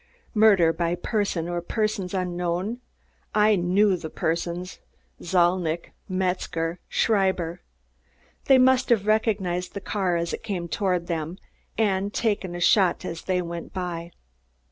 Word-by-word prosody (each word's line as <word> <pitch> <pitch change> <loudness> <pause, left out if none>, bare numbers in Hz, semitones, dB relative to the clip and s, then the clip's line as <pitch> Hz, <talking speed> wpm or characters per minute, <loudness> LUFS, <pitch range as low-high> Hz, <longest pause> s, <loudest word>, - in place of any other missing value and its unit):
Murder 200 -7 +5
by 170 +1 0
person 195 -4 -1
or 175 0 -2
persons 205 -1 -2
unknown? 180 +4 -2 0.6
I 210 0 +5
knew 190 +2 +3
the 165 -3 -6
persons: 170 +3 -3 0.4
Zalnitch, 175 -1 +1 0.2
Metzger, 180 -2 -1
Schreiber. 190 -5 +1 0.8
They 270 - +6
must 260 0 +4
have 220 -5 +3
recognized 200 -5 0
the - - -2
car 190 -3 -1
as 170 0 -2
it - - -4
came 190 -6 -3
toward 180 -1 0
them 165 0 -3 0.4
and 200 -2 +1
taken 205 -6 -1
a - - -4
shot 185 0 +3
as 165 -1 -5
they 180 -1 0
went 170 0 -7
by. 170 -2 -4
180 Hz, 130 wpm, -25 LUFS, 170-205 Hz, 0.8 s, They